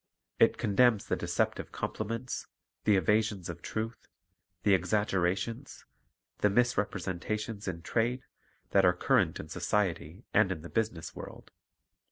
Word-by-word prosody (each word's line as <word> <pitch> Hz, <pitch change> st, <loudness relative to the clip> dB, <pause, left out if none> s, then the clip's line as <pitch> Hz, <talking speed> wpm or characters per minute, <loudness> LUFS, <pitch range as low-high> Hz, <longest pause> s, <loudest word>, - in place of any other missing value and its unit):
It -, -, +5 dB
condemns 110 Hz, +1 st, +3 dB
the -, -, 0 dB
deceptive -, -, -1 dB
compliments, 115 Hz, +4 st, -4 dB, 0.4 s
the 105 Hz, -, +5 dB
evasions 105 Hz, -2 st, +1 dB
of 85 Hz, 0 st, -6 dB
truth, 110 Hz, +5 st, -4 dB, 0.6 s
the 100 Hz, -, +5 dB
exaggerations, 100 Hz, +5 st, 0 dB, 0.5 s
the 105 Hz, -, +4 dB
misrepresentations 105 Hz, -1 st, -1 dB
in 85 Hz, -2 st, -4 dB
trade, 120 Hz, +5 st, 0 dB, 0.5 s
that -, -, +5 dB
are 90 Hz, -, +6 dB
current 90 Hz, -, +2 dB
in -, -, -6 dB
society 95 Hz, -1 st, -1 dB
and 105 Hz, -2 st, +4 dB
in 80 Hz, -4 st, -4 dB
the 85 Hz, -, -8 dB
business 90 Hz, -7 st, -2 dB
world. -, -, -10 dB
105 Hz, 125 wpm, -30 LUFS, 90-110 Hz, 0.6 s, are